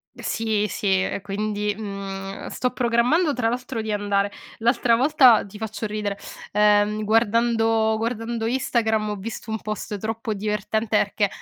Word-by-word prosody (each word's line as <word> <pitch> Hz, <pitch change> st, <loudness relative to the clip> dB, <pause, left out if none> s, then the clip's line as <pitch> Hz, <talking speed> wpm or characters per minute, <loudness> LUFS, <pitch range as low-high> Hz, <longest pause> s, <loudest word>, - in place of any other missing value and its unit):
Sì, 220 Hz, -2 st, -1 dB
sì, 190 Hz, -2 st, +1 dB
e 195 Hz, -, -3 dB
quindi, 210 Hz, +1 st, -2 dB
mhmm, 195 Hz, -2 st, -6 dB
sto 250 Hz, -, -1 dB
programmando 250 Hz, +7 st, +2 dB
tra 230 Hz, -2 st, 0 dB
l'altro 245 Hz, -1 st, -3 dB
di 220 Hz, -, -3 dB
andare 205 Hz, -1 st, 0 dB, 0.3 s
l'altra 235 Hz, 0 st, +3 dB
volta, 260 Hz, -3 st, +5 dB
ti 205 Hz, +1 st, -11 dB
faccio 220 Hz, 0 st, -4 dB
ridere, 205 Hz, -1 st, -3 dB, 0.3 s
ehm, 210 Hz, +1 st, +3 dB
guardando 225 Hz, 0 st, +2 dB
guardando 225 Hz, 0 st, -2 dB
Instagram 225 Hz, -4 st, 0 dB
ho 210 Hz, -, -2 dB
visto 220 Hz, +2 st, -7 dB
un 220 Hz, -, -1 dB
post 215 Hz, 0 st, -4 dB
troppo 220 Hz, +1 st, -3 dB
divertente 210 Hz, +1 st, -1 dB
perché, 205 Hz, 0 st, +1 dB
220 Hz, 140 wpm, -23 LUFS, 205-230 Hz, 0.3 s, volta